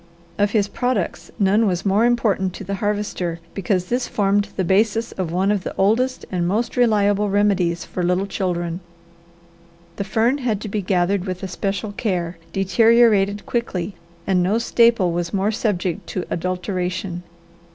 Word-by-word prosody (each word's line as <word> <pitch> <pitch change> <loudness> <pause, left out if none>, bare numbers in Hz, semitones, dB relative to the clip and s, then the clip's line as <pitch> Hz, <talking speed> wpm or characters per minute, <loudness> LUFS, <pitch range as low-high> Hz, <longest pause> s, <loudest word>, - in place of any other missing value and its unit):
Of 205 0 +3
his 205 -1 +1
products 245 -5 -2
none 210 +1 +3
was 180 -1 -1
more 200 +4 +3
important 210 -6 +1
to 205 - -8
the 200 +1 -4
Harvester 205 -5 -2
because 185 -1 0
this 245 +6 -1
formed 205 0 +1
the 190 - +1
basis 215 +5 +1
of 180 -4 -4
one 190 +4 +1
of 200 -3 0
the - - -5
oldest 240 +7 +1
and 175 -2 0
most 215 +6 -1
reliable 210 -4 +3
remedies 195 -4 +1
for 185 - -4
little 180 +2 +1
children. 175 -3 -2 1.2
The 200 - -1
fern 230 +7 +1
had 230 -6 -1
to 215 - -5
be 210 0 -2
gathered 185 0 +1
with 185 0 -5
especial 195 +2 -3
care, 180 -6 -2
deteriorated 205 -1 +3
quickly, 200 -5 -2 0.3
and 185 -2 +2
no 195 +5 +2
staple 230 -5 +3
was 170 +1 -2
more 195 +2 +1
subject 205 -4 -2
to 185 - -3
adulteration. 180 0 -2
195 Hz, 155 wpm, -21 LUFS, 180-215 Hz, 1.2 s, Of